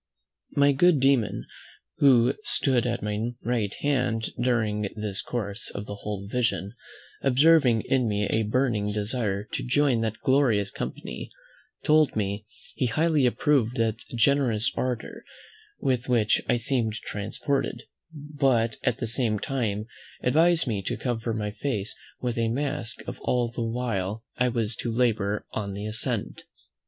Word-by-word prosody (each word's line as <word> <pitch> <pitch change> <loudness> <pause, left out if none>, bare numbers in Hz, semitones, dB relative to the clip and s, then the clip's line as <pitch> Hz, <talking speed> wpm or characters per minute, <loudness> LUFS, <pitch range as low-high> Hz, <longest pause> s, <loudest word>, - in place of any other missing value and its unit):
My 140 0 +5
good 160 +2 +4
demon, 130 -5 +2 0.5
who 130 -2 +5
stood 135 - +2
at 120 -3 -2
my 105 +3 -2
right 115 -4 0
hand 125 -6 0
during 110 -4 +1
this 105 -2 -2
course 105 -2 -3
of 100 - -6
the 100 - -6
whole 100 -1 -5
vision, 115 -3 -1 0.5
observing 135 -3 +5
in 130 -3 +1
me 105 0 0
a 110 - +1
burning 110 -2 0
desire 105 -1 -1
to - - -2
join 130 -2 +2
that 110 -1 -2
glorious 120 -8 +2
company, - - -6 0.5
told 155 -2 +4
me, 105 0 -2 0.3
"he 130 - 0
highly 155 +1 +2
approved 125 -1 +1
that 115 -1 0 0.2
generous 120 -3 +3
ardour 125 -3 -3 0.6
with 130 -2 0
which 115 -4 +3
I - - +4
seemed 120 -2 0
transported; 115 +6 -3 0.3
but 135 -7 0
at 125 -4 +1
the 120 - -3
same 115 -1 0
time 110 -4 -2 0.4
advised 165 +6 +4
me 110 -6 -1
to 115 +4 -3
cover 115 0 -2
my 105 -2 -2
face 105 -2 -3 0.3
with 120 -1 -2
a 115 -1 +1
mask 120 -2 -3 0.2
all 120 -1 0
the 120 - -5
while 115 -3 -2
I 125 - +2
was 115 -2 -1
to 120 - -2
labour 110 -4 +1
on 100 -2 -3
the 100 +1 -5
ascent." 105 - -2
115 Hz, 145 wpm, -26 LUFS, 105-130 Hz, 0.6 s, My